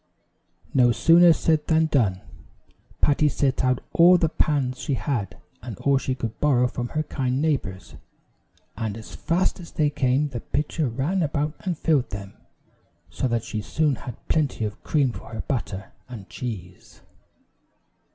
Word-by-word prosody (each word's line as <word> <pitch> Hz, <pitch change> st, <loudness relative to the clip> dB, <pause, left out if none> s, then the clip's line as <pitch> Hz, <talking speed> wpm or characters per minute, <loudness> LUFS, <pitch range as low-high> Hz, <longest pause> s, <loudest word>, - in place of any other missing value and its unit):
No 125 Hz, -2 st, +5 dB
sooner 170 Hz, +7 st, +6 dB
said 160 Hz, -1 st, +1 dB
than 160 Hz, 0 st, +3 dB
done. 110 Hz, -12 st, +1 dB, 0.8 s
Patty 150 Hz, +1 st, +3 dB
set 135 Hz, -1 st, 0 dB
out 125 Hz, -1 st, +1 dB
all 175 Hz, +2 st, +7 dB
the 165 Hz, -2 st, +1 dB
pans 135 Hz, -5 st, 0 dB
she 140 Hz, -, -1 dB
had, 125 Hz, -9 st, -3 dB, 0.2 s
and 115 Hz, -3 st, -7 dB
all 140 Hz, -1 st, +2 dB
she 130 Hz, -1 st, -2 dB
could 115 Hz, -3 st, -5 dB
borrow 130 Hz, -4 st, +3 dB
from 120 Hz, 0 st, -4 dB
her 155 Hz, -, +2 dB
kind 130 Hz, -3 st, -2 dB
neighbors, 135 Hz, -12 st, -2 dB, 0.8 s
and 110 Hz, -1 st, -3 dB
as 110 Hz, -, -10 dB
fast 175 Hz, +3 st, 0 dB
as 170 Hz, -, -11 dB
they 150 Hz, -2 st, +1 dB
came 140 Hz, +1 st, +1 dB
the 125 Hz, -3 st, -5 dB
pitcher 150 Hz, +2 st, -2 dB
ran 145 Hz, +11 st, -1 dB
about 150 Hz, -1 st, -1 dB
and 180 Hz, -4 st, -3 dB
filled 150 Hz, -7 st, +1 dB
them; 100 Hz, 0 st, -7 dB, 0.8 s
so 75 Hz, +12 st, -1 dB
that 115 Hz, -2 st, -1 dB
she 110 Hz, -, -4 dB
soon 150 Hz, +7 st, +1 dB
had 125 Hz, -, -10 dB
plenty 145 Hz, -8 st, 0 dB
of 105 Hz, 0 st, -7 dB
cream 140 Hz, -5 st, +1 dB
for -, -, -10 dB
her 110 Hz, -, -3 dB
butter 100 Hz, -7 st, -4 dB, 0.2 s
and 110 Hz, -6 st, -9 dB
cheese. 95 Hz, -7 st, -8 dB
135 Hz, 160 wpm, -24 LUFS, 115-155 Hz, 0.8 s, all